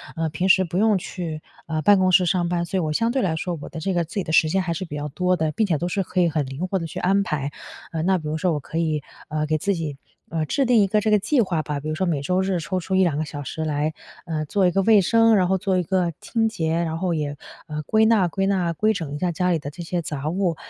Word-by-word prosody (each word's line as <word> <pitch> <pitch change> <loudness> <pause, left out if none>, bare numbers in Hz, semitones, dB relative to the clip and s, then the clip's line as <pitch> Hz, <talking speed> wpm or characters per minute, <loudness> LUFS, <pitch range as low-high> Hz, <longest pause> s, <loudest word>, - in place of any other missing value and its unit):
呃， 165 0 -1
平 165 +5 -1
时 190 0 +5
不 175 0 -4
用 215 0 +4
去， 170 -4 -5 0.2
呃， 160 -1 -2
办 200 +4 +5
公 185 - +3
室 180 - +6
上 175 0 +1
班。 175 0 0
所 180 +3 -2
以 - - +2
我 155 -3 -1
相 230 +8 +1
对 265 +1 0
来 175 -5 0
说， 170 +1 -3
我 - - -7
的 160 - -7
这 190 +4 -1
个 175 -1 +1
自 160 - -13
己 200 - 0
的 160 - -5
时 160 - +5
间 190 +3 +1
还 175 -2 -2
是 175 +3 -4
比 150 - -7
较 145 0 -4
多 180 +5 +1
的， 160 -3 0
并 215 +7 0
且 165 -5 +1
都 175 +4 -2
是 195 - 0
可 185 0 -1
以 170 - +3
很 155 -2 -1
灵 135 +7 -4
活 190 +1 -1
地 165 - -4
去 - - -9
安 195 +2 +3
排。 145 -5 -2 0.4
呃， 160 -2 -2
那 190 +2 +3
比 155 -3 -5
如 155 - -1
说 175 0 +1
我 150 - -1
可 160 - -6
以， 155 -3 0 0.2
呃， 155 0 -1
给 155 +1 +1
自 200 +6 0
己， 160 -6 -4 0.3
呃， 160 -1 -1
制 275 - +1
定 240 -3 +4
一 195 - +3
个 210 +2 +2
这 215 0 +1
个 210 - +6
计 255 +6 +2
划 175 -6 0
吧， 150 -2 -3
比 150 +2 -5
如 155 - -2
说 190 - 0
每 155 -5 0
周 180 +6 +1
日 190 -2 0
抽 185 +3 -2
出 190 +2 -2
1-2 175 -6 +3
个 155 - -1
小 145 -1 -6
时 160 +4 -4
来， 150 +1 -1 0.3
呃， 155 -3 -2
做 195 +5 +1
一 - - +2
个 195 - +2
卫 215 0 +6
生， 225 +3 +4
然 185 -3 +3
后 190 +1 +2
做 190 0 0
一 180 - +1
个 180 0 0
清 225 -2 0
洁。 165 -8 -2
然 160 -1 -2
后 180 0 -1
也， 150 -2 -2 0.3
呃， 150 -1 -4
归 220 +8 +3
纳 220 -5 +4
归 195 +3 -1
纳， 185 -4 +1
归 215 +6 +2
整 165 -8 -5
一 - - -3
下 180 +1 0
家 180 +2 0
里 165 - +1
的 145 - -6
这 160 +4 -9
些 175 +1 -2
杂 150 -1 -4
物。 180 -1 0
175 Hz, 330 characters per minute, -23 LUFS, 155-190 Hz, 0.4 s, 室